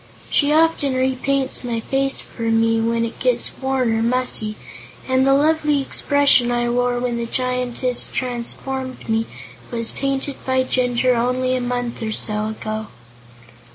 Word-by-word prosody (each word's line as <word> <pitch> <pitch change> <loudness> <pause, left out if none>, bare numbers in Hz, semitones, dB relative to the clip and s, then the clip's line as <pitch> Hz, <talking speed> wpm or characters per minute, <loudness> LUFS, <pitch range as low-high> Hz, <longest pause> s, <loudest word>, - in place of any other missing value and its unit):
She 285 -1 +3
often 310 -4 +2
repaints 265 +1 0
my 235 -2 -2
face 270 +3 -1
for 230 -1 -5
me, 225 0 +2
when 230 0 0
it 230 - -8
gets - - 0
worn 260 -3 +1
or 225 - 0
mussy, 235 -3 +2 0.5
and 260 0 +2
the 270 - +5
lovely 300 0 +2
expression 275 -2 +3
I 240 0 0
wore 245 0 +1
when 245 -1 -2
the 235 0 -3
Giantess 250 0 -1
transformed 255 +1 -4
me 225 0 0 0.4
was 230 -1 +1
painted 275 0 -3
by 260 0 +1
Jinjur 250 0 +1
only 255 +2 0
a 255 - -1
month 245 -1 -3
or 220 -1 -2
so 210 0 -1
ago." 215 0 -5
250 Hz, 150 wpm, -20 LUFS, 235-265 Hz, 0.5 s, the